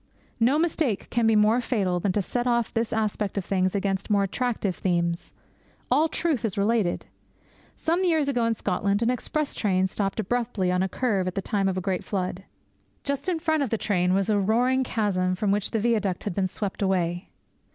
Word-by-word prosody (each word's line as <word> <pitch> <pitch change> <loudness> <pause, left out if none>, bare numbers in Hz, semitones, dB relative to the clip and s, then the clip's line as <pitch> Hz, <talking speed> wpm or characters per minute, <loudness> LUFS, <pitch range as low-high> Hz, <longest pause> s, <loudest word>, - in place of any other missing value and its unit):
No 245 +6 +4
mistake 310 - 0
can 235 -1 +2
be 225 - +4
more 215 +3 +4
fatal 195 -8 0
than 190 +2 0
to 205 - 0
set 245 +5 -2
off 235 -2 +1
this 225 0 -1
aspect 210 -2 -1
of 195 - -1
things 185 0 0
against 195 0 -1
more 200 -1 +3
attractive 205 -2 -1
themes. 170 -1 -1 0.6
All 300 +5 +4
truth 310 -9 -1
is 210 -4 -2
related. 205 -3 +1 0.7
Some 340 +3 0
years 320 -5 +2
ago 245 -4 +1
in 230 0 +1
Scotland 200 +2 0
an 235 - +2
express 290 +4 -2
train 190 -3 +1
stopped 195 +2 -2
abruptly 220 -3 0
on 180 0 +1
a 190 - 0
curve 200 -4 0
in 185 - -2
the 195 - -1
time 200 -3 0
of 185 - -2
a - - -1
great 185 -1 -2
flood. 185 -1 -3 0.6
Just 280 +4 -2
in 350 - +1
front 315 -2 0
of 275 - 0
the 225 - 0
train 180 -3 +1
was 195 -1 +1
a 210 -2 +2
roaring 245 +6 +2
chasm 190 -6 0
from 200 +2 0
which 205 0 +1
the 225 - -1
viaduct 215 -5 0
had 205 - -3
been 190 +1 0
swept 195 +2 -4
away. 180 -2 0
210 Hz, 205 wpm, -26 LUFS, 190-240 Hz, 0.7 s, No